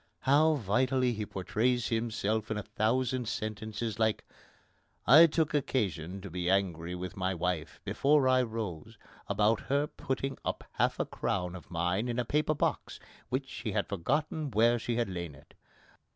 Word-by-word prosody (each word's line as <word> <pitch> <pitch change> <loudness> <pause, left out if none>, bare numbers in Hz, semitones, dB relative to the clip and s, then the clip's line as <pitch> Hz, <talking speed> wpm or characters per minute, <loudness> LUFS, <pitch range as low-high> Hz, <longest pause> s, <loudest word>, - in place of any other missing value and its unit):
How 155 +4 +4
vitally 125 +2 +1
he 105 -2 -4
portrays 115 +5 0
himself 110 -2 -1
in 110 - -1
a 105 - -3
thousand 125 +3 0
sentences 110 +1 -4
like: 110 -1 +1 0.8
"I 155 +6 +9
took 160 -1 0
occasion 100 - -1
to 100 - -7
be 90 0 -2
angry 90 -3 0
with 90 -1 -6
my 95 0 -1
wife 85 -3 -2
before 140 -1 +3
I 130 0 +5
rose 110 -9 -5 0.3
about 105 +2 +2
her 140 +3 0
putting 135 -2 -4
up - - -3
half - - 0
a - - +1
crown 90 -1 -2
of 85 - -11
mine 90 +6 0
in 120 0 -2
a 125 - 0
paper 150 +4 +1
box, - - -1 0.3
which 130 +1 -1
she 110 -5 -5
had 105 -2 +1
forgotten 150 - -1
where 120 +1 +3
she 120 +1 -2
had 120 0 +1
lain 85 -5 -5
it. - - -19
110 Hz, 165 wpm, -31 LUFS, 95-130 Hz, 0.8 s, I